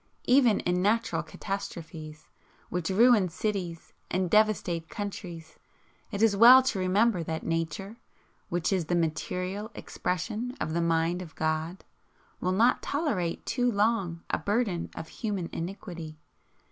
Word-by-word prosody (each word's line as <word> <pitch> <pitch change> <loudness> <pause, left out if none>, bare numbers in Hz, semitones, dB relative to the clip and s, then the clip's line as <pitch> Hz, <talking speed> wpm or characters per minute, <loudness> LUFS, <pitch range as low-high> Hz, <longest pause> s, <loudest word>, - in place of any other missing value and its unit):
Even 250 -4 +4
in 180 0 0
natural 215 +4 +1
catastrophes, 160 -6 -6 0.4
which 175 -2 -2
ruin 210 -1 +5
cities 180 -3 -4 0.2
and 185 -1 -1
devastate 200 -6 +2
countries, 180 -6 -7 0.5
it 205 -1 -1
is 220 -3 +4
well 245 +5 +9
to 225 -6 -1
remember 190 +2 +2
that 160 0 -4
Nature, 165 +6 -3 0.5
which 175 +2 0
is 180 -4 0
the 175 - 0
MATERIAL 180 +5 -2
EXPRESSION 215 +8 -3
of 155 0 -2
the 170 - +1
mind 165 +1 +1
of 160 -3 -10
God, 160 +3 -2 0.6
will 180 - 0
not 225 +6 +3
tolerate 270 - -1
too 245 -1 +1
long 200 -6 0
a - - +1
burden 205 -5 -1
of 160 - -6
human 200 -5 -3
iniquity. 170 -3 -6
185 Hz, 135 wpm, -28 LUFS, 165-215 Hz, 0.6 s, well